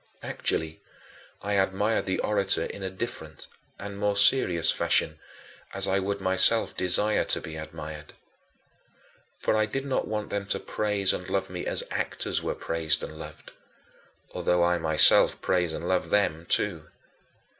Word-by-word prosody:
Actually, 80 0 -2 0.6
I 105 - -2
admired 100 +3 +1
the 95 - 0
orator 100 -2 +1
in 100 - -8
a 95 - -3
different 95 -5 -6 0.3
and 100 0 -8
more 105 -1 0
serious 100 -6 +4
fashion, - - +1 0.6
as 100 0 +1
I 95 0 +1
would 100 +1 -2
myself 95 +4 +3
desire 105 +4 +2
to - - +1
be 80 - -8
admired. 75 -1 -8 1.2
For - - 0
I 110 0 +2
did 135 +5 -3
not 135 - -1
want 105 0 -4
them 100 -1 -3
to - - 0
praise 105 -2 0
and - - -5
love - - -2
me - - -5
as - - 0
actors - - -2
were - - -3
praised 80 -2 -1
and 80 - -8
loved - - -10 0.8
although 90 0 +1
I 85 0 +2
myself 80 -1 +5
praise 90 -3 0
and 85 +2 -5
love 95 -1 0
them 85 -5 +1
too. 80 -7 0
95 Hz, 155 wpm, -27 LUFS, 85-105 Hz, 1.2 s, myself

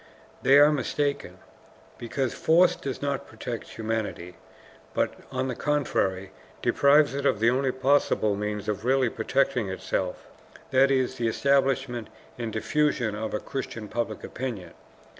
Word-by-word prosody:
They 135 +1 +6
are 145 +1 +7
mistaken, 145 0 -2 0.6
because 120 +2 -2
force 170 +3 +4
does 135 0 -6
not 140 -1 -2
protect 115 +1 -7
humanity, 110 -5 -3 0.6
but, - - +1 0.2
on 130 0 -1
the 130 - -2
contrary, 115 -9 -1 0.3
deprives 145 0 +4
it 140 0 -3
of 125 -7 +2
the 115 +2 +4
only 130 +1 +1
possible 130 -5 +2
means 105 0 -3
of 105 0 -2
really 130 -1 +2
protecting 120 -2 0
itself, 95 -1 -3 0.5
that 135 +1 +5
is, 130 -1 +1
the 115 - +1
establishment 135 -1 +1 0.3
and 115 -2 -3
diffusion 115 0 0
of 110 +1 -3
a - - -1
Christian 120 -5 -5
public 110 -1 -3
opinion. 120 -8 -5
125 Hz, 140 wpm, -26 LUFS, 110-140 Hz, 0.6 s, are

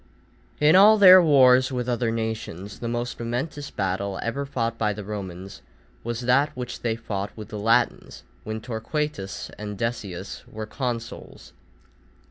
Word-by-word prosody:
_ - - -33 0.6
In 150 +3 +5
all 210 +3 +8
their 185 -2 +9
wars 130 -4 +5
with 125 -1 -3
other 120 -1 0
nations, 110 -3 -4
the 120 - -4
most 120 +1 -3
momentous 130 +5 -4
battle 95 0 -2
ever 140 +4 -3
fought 115 -4 -2
by 105 -2 0
the 105 +1 -7
Romans, 95 -2 -7 0.4
was 120 +1 -4
that 125 +4 +3
which 125 -1 -5
they 115 -2 -1
fought 105 -3 -4
with 110 - -8
the 105 - -6
Latins 115 +3 0 0.2
when 110 0 -5
Torquatus 115 -2 -4
and 105 -1 -6
Decius 100 -5 -4
were 110 0 -7
consuls. 115 0 -6
115 Hz, 150 wpm, -24 LUFS, 105-130 Hz, 0.6 s, their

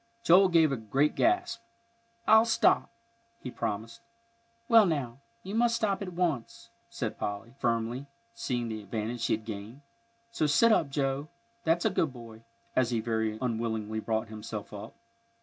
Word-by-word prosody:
Joel 185 +3 +6
gave 165 -4 +4
a 135 - -1
great 135 +7 +1
gasp. 355 -8 +1 0.7
"I'll 220 +1 +7
stop," 230 - +3 0.5
he 125 - -7
promised. 115 +2 -4 0.7
"Well, 225 -4 +7
now, 135 -7 -2 0.2
you 195 - -6
must 230 +1 +3
stop 210 -4 0
at 185 -2 -5
once," 170 -9 -2 0.2
said - - -4
Polly, 105 +4 -4
firmly, 120 +3 -1 0.3
seeing 125 - -2
the 110 -1 -5
advantage 110 +3 -4
she 115 - +1
had 110 0 -3
gained. 110 +5 -7 0.5
"So 155 -9 0
sit 230 +11 +5
up, 160 -9 +3
Joe, 135 +1 -1 0.4
that's 165 +3 +2
a 220 - +3
good 165 -5 +1
boy," 115 -3 -11 0.3
as 130 -2 +3
he 120 -2 0
very 110 -1 -1
unwillingly 110 -2 -2
brought 110 0 -2
himself 105 -1 -7
up. 100 - -8
125 Hz, 155 wpm, -29 LUFS, 110-175 Hz, 0.7 s, I'll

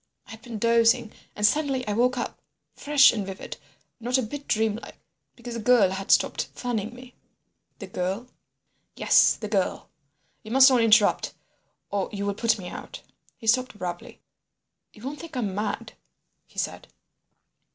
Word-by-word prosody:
I - - -14
had 225 0 -11
been 230 -2 -7
dozing, 230 +1 +3 0.2
and 210 - +1
suddenly 270 0 +1
I 210 - 0
woke 250 +3 +2
up—fresh 285 +3 +1
and 215 -3 -2
vivid—not 225 +5 -6
a 260 - 0
bit 280 +6 -7
dreamlike—because 225 +2 -4
the 230 - -4
girl 220 -4 +4
had 195 +1 -5
stopped - - +3
fanning 235 -2 -3
me." 250 0 -13 0.6
"The 200 - -8
girl?" 190 +4 -3 0.7
"Yes, - - +5
the 215 - -6
girl. 200 -3 -1 0.5
You 215 - -11
must 265 +3 +7
not 250 -2 +4
interrupt 215 -2 +3 0.6
or 200 -1 -1
you 200 -1 -4
will 200 - 0
put 230 +3 +1
me 185 -3 -8
out." - - -9 0.3
He - - -13
stopped 250 +1 +2
abruptly. 175 -3 -6 0.7
"You 215 - -17
won't 280 +3 -5
think 325 -5 -8
I'm 210 -6 -2
mad?" 210 +2 -3 0.5
he - - -23
said. - - -3
225 Hz, 150 wpm, -25 LUFS, 205-250 Hz, 0.7 s, must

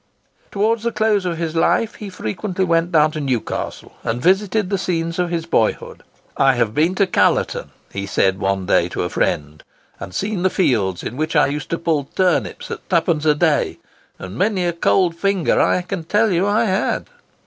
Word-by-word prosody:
Towards 215 +2 0
the 235 +1 -1
close 215 -4 +1
of 170 -2 -2
his 165 -1 -3
life 220 +6 +2
he 210 - -8
frequently 185 - -3
went 165 0 +1
down 155 -2 +4
to 155 - -5
Newcastle, 130 -5 -3
and 115 +2 -2
visited 195 - +1
the 195 - 0
scenes 165 -1 -2
of 175 -1 +1
his 165 -1 -2
boyhood. 115 -9 -1 0.3
"I 135 -1 +4
have 115 -3 0
been 165 +8 +2
to 200 - +3
Callerton," - - +1 0.4
said 95 -1 +2
he 95 - -14
one 95 -1 -1
day 85 -1 +2
to - - -3
a 90 - -2
friend, 75 +1 -1 0.4
"and 95 - -7
seen 200 - -2
the 185 - +3
fields 105 - 0
in 120 - -5
which 155 +2 -2
I 150 - +5
used 145 +1 -4
to 165 - -1
pull 160 -4 0
turnips 185 -2 0
at - - -8
twopence 165 -3 +1
a 150 -1 +4
day; 155 -1 +1 0.4
and 95 +1 -8
many 190 - +1
a 175 - 0
cold 170 +1 +2
finger, 195 0 +1
I 180 - +2
can 180 -1 -5
tell 210 +5 +2
you, 180 +2 +1
I 210 +3 +2
had." 190 0 0
170 Hz, 195 wpm, -20 LUFS, 140-190 Hz, 0.4 s, I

